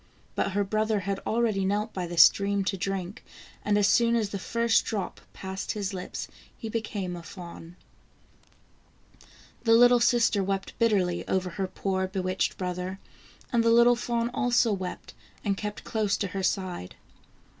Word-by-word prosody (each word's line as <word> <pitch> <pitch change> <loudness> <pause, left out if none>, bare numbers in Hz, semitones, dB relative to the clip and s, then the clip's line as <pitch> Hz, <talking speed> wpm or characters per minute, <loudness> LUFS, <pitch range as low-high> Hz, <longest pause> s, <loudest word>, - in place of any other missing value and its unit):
But 200 - -1
her 205 +1 +2
brother 215 +1 0
had 195 +1 -2
already 220 -4 +1
knelt 210 +3 -1
by 180 -2 -3
the 170 0 -6
stream 200 +3 +5
to 195 +1 -1
drink, 195 0 -4 0.4
and 210 0 +2
as 205 -1 +4
soon 235 +3 +4
as 220 -3 0
the 200 - -4
first 230 +3 +2
drop 205 -4 -4
passed 190 0 -5
his 205 -2 -3
lips 185 -1 -5 0.3
he 225 - -6
became 205 -5 -3
a 175 - -7
fawn. 170 -1 -10 1.9
The 225 -1 +4
little 245 +1 +7
sister 235 -4 +3
wept 195 0 -2
bitterly 195 -7 +2
over 185 -1 0
her 190 +2 -2
poor 190 0 -2
bewitched 185 -1 -1
brother, 180 +1 -3 0.6
and 235 -1 +3
the 230 - +3
little 235 +1 +6
fawn 235 0 -1
also 245 -4 +2
wept, 185 -2 -6 0.3
and 200 -1 +1
kept 210 +1 -5
close 215 -2 0
to 200 - -2
her 195 +1 -3
side. 185 - -2
200 Hz, 160 wpm, -27 LUFS, 190-225 Hz, 1.9 s, little